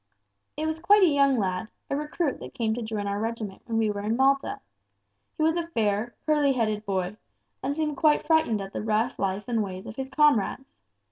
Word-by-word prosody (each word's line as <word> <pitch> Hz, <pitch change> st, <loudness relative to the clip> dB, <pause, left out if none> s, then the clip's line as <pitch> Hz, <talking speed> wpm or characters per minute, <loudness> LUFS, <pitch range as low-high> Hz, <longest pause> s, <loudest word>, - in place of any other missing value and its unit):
"It 310 Hz, -, -1 dB
was 315 Hz, 0 st, -2 dB
quite 405 Hz, +4 st, +5 dB
a 335 Hz, -5 st, +5 dB
young 275 Hz, -2 st, +4 dB
lad, 190 Hz, 0 st, -1 dB, 0.2 s
a -, -, -1 dB
recruit 300 Hz, +1 st, -2 dB
that -, -, -10 dB
came 225 Hz, -4 st, 0 dB
to 240 Hz, -, -3 dB
join 220 Hz, -2 st, -3 dB
our 200 Hz, 0 st, -2 dB
regiment 220 Hz, -3 st, -4 dB
when 230 Hz, -2 st, -2 dB
we 220 Hz, -2 st, +2 dB
were 205 Hz, 0 st, -4 dB
in 215 Hz, +2 st, 0 dB
Malta. 275 Hz, +1 st, +2 dB, 0.8 s
He 310 Hz, -, 0 dB
was 320 Hz, +2 st, +3 dB
a 340 Hz, -1 st, -2 dB
fair, 220 Hz, -5 st, -1 dB
curly 295 Hz, -3 st, +3 dB
headed 215 Hz, -4 st, -1 dB
boy, 190 Hz, +1 st, -1 dB, 0.4 s
and 280 Hz, +2 st, -2 dB
seemed 300 Hz, -2 st, -1 dB
quite 300 Hz, 0 st, +3 dB
frightened 310 Hz, -10 st, +2 dB
at 195 Hz, 0 st, -7 dB
the -, -, -3 dB
rough 220 Hz, +3 st, 0 dB
life 195 Hz, +1 st, -1 dB
and 230 Hz, -2 st, +1 dB
ways 190 Hz, -1 st, -5 dB
of 220 Hz, -, -9 dB
his 265 Hz, 0 st, -4 dB
comrades. 275 Hz, -2 st, +2 dB
235 Hz, 210 wpm, -26 LUFS, 210-295 Hz, 0.8 s, quite